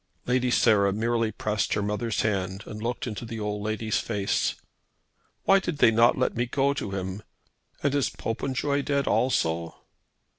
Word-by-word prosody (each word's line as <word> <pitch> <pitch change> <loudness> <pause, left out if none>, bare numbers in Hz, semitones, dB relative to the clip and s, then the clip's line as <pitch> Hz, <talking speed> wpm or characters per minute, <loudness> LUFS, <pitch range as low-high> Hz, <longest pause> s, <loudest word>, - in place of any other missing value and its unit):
Lady 125 0 +1
Sarah 105 -5 +4
merely 115 +2 0
pressed 105 -1 -1
her 105 - 0
mother's 105 +2 -1
hand 95 -2 -1
and 105 0 -8
looked 120 +2 -2
into 115 -2 -5
the 115 -1 -6
old 105 -1 -3
lady's 110 0 -1
face. 100 -4 0 0.9
"Why 195 0 +5
did 175 -6 -4
not 115 +2 +5
they - - -6
let 130 - +1
me 120 +1 0
go 140 +3 +1
to 135 - -4
him? 95 +1 -4 0.6
And 140 -1 +2
is 140 -2 +2
Popenjoy 135 +4 -2
dead 140 -1 0
also?" 85 -8 0
110 Hz, 160 wpm, -26 LUFS, 105-125 Hz, 0.9 s, Why